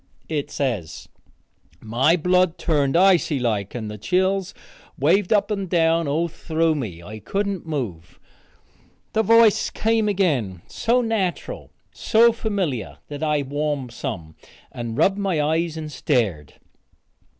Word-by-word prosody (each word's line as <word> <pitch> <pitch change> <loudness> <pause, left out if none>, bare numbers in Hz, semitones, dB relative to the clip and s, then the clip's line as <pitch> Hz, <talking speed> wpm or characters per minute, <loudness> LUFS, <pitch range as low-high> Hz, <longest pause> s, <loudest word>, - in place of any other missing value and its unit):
it 150 -3 -2
says. 110 - -3 0.7
My 120 +9 +2
blood 180 0 +2
turned 145 -3 +1
icy 180 -5 +4
like 110 -5 -2
and 110 -3 -4
the 105 0 -7
chills 185 - 0 0.5
waved 180 +8 +2
up 205 0 +2
and 195 -3 -2
down 165 -2 +2
all 160 +4 0
through 165 0 0
me. 100 - -5
I 110 +4 -8
couldn't 195 - -3
move. 105 - -5 0.9
The 220 - +3
voice 230 0 +4
came 225 0 +1
again, 135 - 0
so 240 +2 +1
natural, 225 - -2 0.2
so 230 +1 +4
familiar, 195 - -3
that 145 0 -7
I 150 -2 +1
warmed 145 -2 -3
some, 95 - -6 0.4
and 115 -1 -5
rubbed 195 +1 +3
my 190 -5 0
eyes 160 +2 0
and 155 -1 -6
stared. 110 - -1
160 Hz, 130 wpm, -22 LUFS, 125-195 Hz, 0.9 s, icy